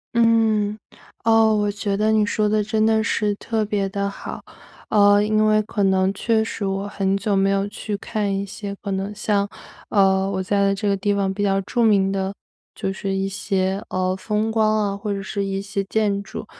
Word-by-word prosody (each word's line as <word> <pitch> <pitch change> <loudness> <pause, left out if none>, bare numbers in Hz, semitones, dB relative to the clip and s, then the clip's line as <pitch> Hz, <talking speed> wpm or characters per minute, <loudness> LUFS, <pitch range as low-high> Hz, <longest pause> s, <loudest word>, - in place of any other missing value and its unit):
嗯， 220 -3 +3 0.5
哦。 225 -1 +4
我 205 -1 +1
觉 200 -1 -2
得 215 +1 +2
你 215 -1 +3
说 210 0 0
的 215 0 +1
真 220 0 +1
的 220 0 +3
是 210 -2 0
特 220 0 -2
别 200 -2 -1
的 200 +1 -2
好， - - -8 0.5
呃， 205 -1 +5
因 215 0 +2
为 215 0 +4
可 210 0 -3
能 190 0 +2
确 220 +2 +1
实 220 -1 -5
我 195 +1 -2
很 195 -1 0
久 200 0 0
没 195 0 +3
有 195 0 +1
去 205 0 -5
看 210 -1 -2
一 195 +1 -2
些 200 0 -7
可 200 - -3
能 195 +2 -2
像， 200 -1 0 0.4
呃， 195 -2 +3
我 190 -1 -2
在 200 +1 +1
这 205 +1 -3
个 200 - +2
地 205 +1 0
方 195 -1 0
比 205 - -4
较 195 -1 +2
著 235 +5 -1
名 195 -3 +3
的 195 0 -1 0.4
就 195 - -3
是 195 0 -4
一 195 0 -1
些， 195 0 -1
呃， 185 0 0
风 210 +3 -1
光 215 -1 +2
啊， 200 - -2
或 205 +1 -4
者 200 - -2
是 200 +1 -3
一 195 0 -2
些 195 0 -3
建 205 -1 0
筑。 - - -8
200 Hz, 220 characters per minute, -22 LUFS, 195-215 Hz, 0.5 s, 呃